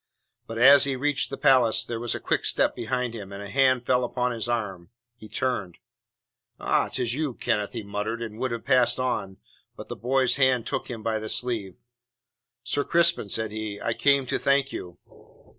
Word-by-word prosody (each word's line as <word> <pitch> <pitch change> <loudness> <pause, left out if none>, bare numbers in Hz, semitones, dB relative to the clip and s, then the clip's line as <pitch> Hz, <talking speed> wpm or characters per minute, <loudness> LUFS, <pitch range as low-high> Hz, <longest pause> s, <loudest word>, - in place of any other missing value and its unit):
But 115 - -6
as 140 +4 +7
he 135 -1 -1
reached 145 +2 0
the 135 - -5
palace 115 -4 +4
there 115 -1 -4
was 120 0 -2
a - - -4
quick - - -1
step - - +2
behind 125 -2 -2
him, 100 -4 -8
and 100 +1 -7
a 100 - -8
hand 130 -2 +3
fell 125 0 +2
upon 125 0 -1
his 115 0 -3
arm. 100 -7 -3 0.3
He 110 -2 -13
turned. 105 -6 -2 0.8
"Ah, - - +1
'tis 120 -3 -1
you, 145 -3 -2
Kenneth," 105 -1 -1
he 115 -3 -5
muttered, 105 +3 -4
and 110 -1 -7
would 130 - -1
have 115 -1 -5
passed 125 0 +3
on, 100 -7 -2 0.4
but - - -10
the - - -5
boy's 130 +1 +1
hand 130 -4 +3
took - - -3
him 115 -3 -6
by 110 -1 -1
the 110 0 -5
sleeve. 110 -7 -2 0.9
"Sir 145 +3 0
Crispin," 170 -10 +2
said 110 +1 -2
he, 110 -1 -5
"I 115 - -1
came 140 +1 +3
to - - -2
thank 140 0 +2
you." 90 -1 -7
120 Hz, 195 wpm, -25 LUFS, 110-130 Hz, 0.9 s, as